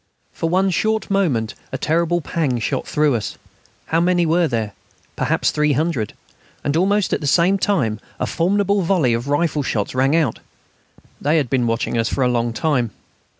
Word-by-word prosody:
For 165 - -2
one 190 +2 +2
short 220 +3 0
moment 130 - +1 0.2
a - - -2
terrible 170 +2 +1
pang 150 -5 -1
shot - - -2
through 150 -2 +2
us. 115 -3 -3 0.5
How 165 +1 +1
many 175 0 +2
were 165 +1 +2
there? 115 -5 -2 0.4
Perhaps - - +1
300. 150 - 0 0.5
And 145 - 0
almost 200 +4 +2
at - - 0
the 145 - -2
same 180 +7 +3
time 130 - 0 0.2
a - - 0
formidable 200 +3 +1
volley 170 -9 +2
of 120 +3 -2
rifle 150 +1 +1
shots 110 -6 -2
rang 135 +4 +2
out. 155 -9 +1 0.8
They 150 +3 +2
had 140 -6 0
been 125 -3 +2
watching 115 +1 -1
us 115 - +1
for 135 - 0
a - - +3
long 120 -1 0
time. 125 -1 0
150 Hz, 175 wpm, -20 LUFS, 120-175 Hz, 0.8 s, same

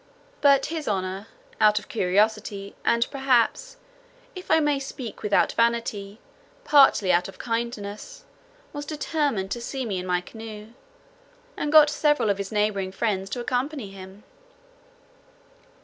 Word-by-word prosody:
But 280 -1 +5
his 315 -2 -4
honour, 190 +1 -2 0.3
out 210 -1 +5
of 210 - -3
curiosity, 205 0 0
and, 235 0 +2
perhaps, 270 - +1 0.6
(if 365 -1 -10
I 320 - +5
may 295 -2 +1
speak 260 -5 -7
without 210 -2 +2
vanity,) 230 -3 -1 0.4
partly 270 - +5
out 175 - +2
of 195 - -12
kindness, 230 - -5 0.5
was 290 -1 -5
determined 290 -9 -2
to 240 - -3
see 265 +2 -4
me 195 -5 -2
in 180 - -6
my 180 -1 +1
canoe, 215 +2 -10 0.9
and 295 - -2
got 300 -1 +7
several 295 -7 +2
of 200 - -3
his 195 -1 -4
neighbouring 210 -3 0
friends 195 -1 -2
to 245 - -4
accompany 250 -2 -3
him. 190 +1 -12
225 Hz, 135 wpm, -25 LUFS, 200-275 Hz, 0.9 s, got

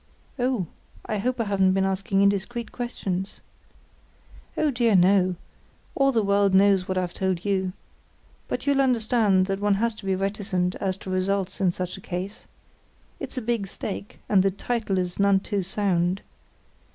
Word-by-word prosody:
"Oh, 245 -6 +1 0.4
I 215 - -2
hope 250 +4 -1
I - - +2
haven't 195 -3 +2
been 190 0 +2
asking 195 +1 0
indiscreet 210 +4 0
questions?" 195 -6 -4 1.2
"Oh, 305 - +2
dear 235 -4 +2
no; 185 0 +4 0.6
all 275 0 +3
the 225 -4 +2
world 200 -1 +3
knows 195 -1 +4
what 185 - -1
I've 180 -1 -1
told 190 -1 -1
you. 190 -2 0 0.8
But - - -3
you'll 280 -1 +3
understand 225 -6 +3
that 195 0 -2
one 205 0 +2
has 230 +3 0
to 215 - -12
be 190 - +2
reticent 195 -2 -1
as 190 -1 -2
to 190 - -7
results 190 +1 -1
in 185 -2 +3
such 180 +1 -5
a - - -11
case. 185 +4 -6 0.7
It's - - -6
a 255 - -2
big 225 -3 -1
stake, 200 +1 -6
and 200 -3 +4
the 195 - +3
_title 210 0 -2
is 180 0 -2
none 200 -1 +4
too 200 0 -2
sound. 185 -1 0
195 Hz, 165 wpm, -25 LUFS, 185-215 Hz, 1.2 s, no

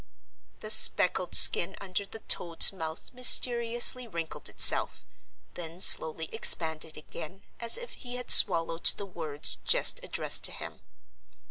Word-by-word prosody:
The 215 - -6
speckled 180 -4 +2
skin 190 +3 +3
under 195 +1 -9
the 225 - -16
toad's 170 +2 -1
mouth 160 +1 -12
mysteriously 240 0 +1
wrinkled 165 -6 -10
itself, - - -1 0.5
then 170 0 -13
slowly 160 -3 +3
expanded 160 -7 -1
again, 155 +4 -15 0.2
as 235 -1 -2
if 485 0 -15
he 245 -2 -13
had 250 0 -1
swallowed 165 0 +4
the 200 - -11
words 160 -5 -4
just - - -1
addressed - - -4
to - - +1
him. - - -14
185 Hz, 130 wpm, -23 LUFS, 165-235 Hz, 0.5 s, swallowed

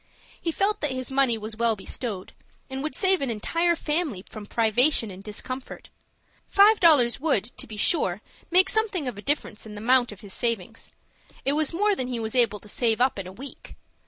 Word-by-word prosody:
He 330 - -1
felt 395 +5 0
that 295 - 0
his 255 0 -4
money 265 -4 +2
was 215 0 -6
well 230 0 +2
bestowed, 200 -1 -5 0.4
and 265 0 -3
would 305 -2 -3
save 380 0 +3
an 275 - -1
entire 335 +10 +1
family 300 - -2
from 210 -1 -10
privation 230 +1 +2
and 190 +1 -11
discomfort. 255 +5 -7 0.6
Five 410 +2 +5
dollars 280 -9 +5
would, 245 -7 -1
to - - -5
be 215 - -9
sure, 210 - 0 0.3
make 370 +2 +5
something 405 -9 0
of 230 -5 -5
a - - -7
difference 230 -5 -2
in 210 - -9
the - - -7
amount 250 0 +3
of 205 - -12
his 200 -2 -10
savings. 230 -7 -2 0.6
It 275 - +2
was 305 -1 +2
more 410 +4 +2
than 255 - -1
he 245 -2 -3
was 220 -1 -3
able 235 -5 +2
to - - -13
save 225 +1 0
up 255 -4 +2
in 190 - -5
a - - -8
week. 260 +8 -9
250 Hz, 205 wpm, -25 LUFS, 215-310 Hz, 0.6 s, Five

